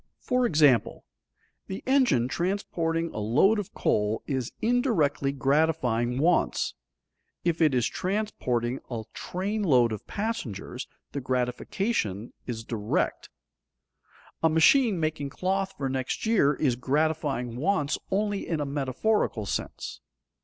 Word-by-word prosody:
For 250 -1 +1
example, 145 - +3 0.6
the 190 - -6
engine 255 - +3
transporting 170 -1 -1
a - - -4
load 145 - +3
of 200 - -5
coal 105 +1 +1
is 130 -3 -2
indirectly 215 - +1
gratifying 135 -4 +1
wants; 165 +5 +2 0.7
if 170 -1 0
it 150 -5 +4
is 120 -3 +2
transporting 160 - -1
a 115 -3 -4
train 200 +4 -3
load 125 - +4
of 110 - -6
passengers, 210 - -4 0.2
the 140 - -4
gratification 125 - -1
is 115 -2 -4
direct. 110 -2 -2 1.1
A 160 - +4
machine 195 - +4
making 155 -3 -1
cloth 190 +5 -1
for 135 - -2
next 130 - -2
year 215 -11 +4
is 130 -4 +1
gratifying 140 -2 0
wants 150 -1 0
only 205 0 -1
in 165 -3 -1
a 145 - -1
metaphorical 140 - 0
sense. - - -4
150 Hz, 120 wpm, -27 LUFS, 125-195 Hz, 1.1 s, it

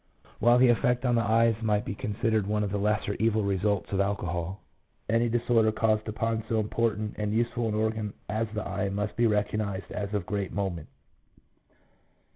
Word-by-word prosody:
While 120 +2 +5
the 125 0 +6
effect 125 +2 +2
on 120 - +3
the 115 - +3
eyes 115 +1 +3
might 105 -2 +1
be - - -3
considered 110 0 -1
one 105 0 0
of 100 - -2
the 100 - -1
lesser 105 0 0
evil 110 -1 +2
results 100 0 0
of 100 - 0
alcohol, 95 -2 -2 0.5
any 115 +2 +2
disorder 115 -1 +2
caused 110 0 +1
upon 110 +1 -1
so 110 - +2
important 110 0 -1
and 105 0 -1
useful 120 0 0
an 105 - -1
organ 110 -1 -1
as 110 +2 -1
the 110 - -3
eye 100 - -2
must 105 +1 -3
be 120 0 +3
recognized 105 -2 -1
as 100 -1 -4
of 100 -4 -1
great 100 -1 -2
moment. 95 -6 -3
105 Hz, 180 wpm, -28 LUFS, 100-115 Hz, 0.5 s, the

